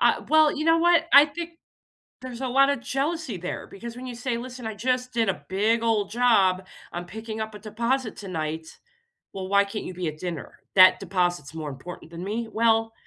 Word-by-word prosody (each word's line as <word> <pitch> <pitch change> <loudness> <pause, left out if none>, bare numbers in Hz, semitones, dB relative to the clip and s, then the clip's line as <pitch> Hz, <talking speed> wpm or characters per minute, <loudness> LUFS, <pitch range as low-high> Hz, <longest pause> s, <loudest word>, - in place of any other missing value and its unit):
Ah, - - +3
well, 310 -1 +5
you 305 - -2
know 330 0 +5
what? 340 -1 +4
I 280 +1 +10
think 340 +3 -6 0.7
there's 255 -1 -7
a 260 - -1
lotta 275 +2 +4
jealousy 275 - -2
there, 180 +1 -5
because 235 +4 -9
when 255 +1 -8
you 245 -2 -6
say, 240 -1 -2
"Listen, 250 -1 -7
I 220 - -5
just 250 +3 -1
did 225 -3 +1
a 190 - -4
big 220 +4 +2
old 210 -3 +1
job. 195 -6 +3 0.3
I'm 175 +1 -4
picking 220 +3 -6
up 220 -1 -5
a - - -9
deposit 235 +3 -2
tonight." 160 -4 -5 0.5
"Well, 190 -1 -6
why 200 +1 +4
can't 205 +2 -6
you - - -6
be 180 -1 -3
at 155 0 -4
dinner? 170 -3 -6 0.2
That 185 -1 +8
deposit's 175 -5 -1
more 155 -2 -5
important 160 +5 -9
than 170 +1 -7
me?" 225 +4 -3
"Well, 225 0 +2
220 Hz, 200 wpm, -25 LUFS, 185-255 Hz, 0.7 s, I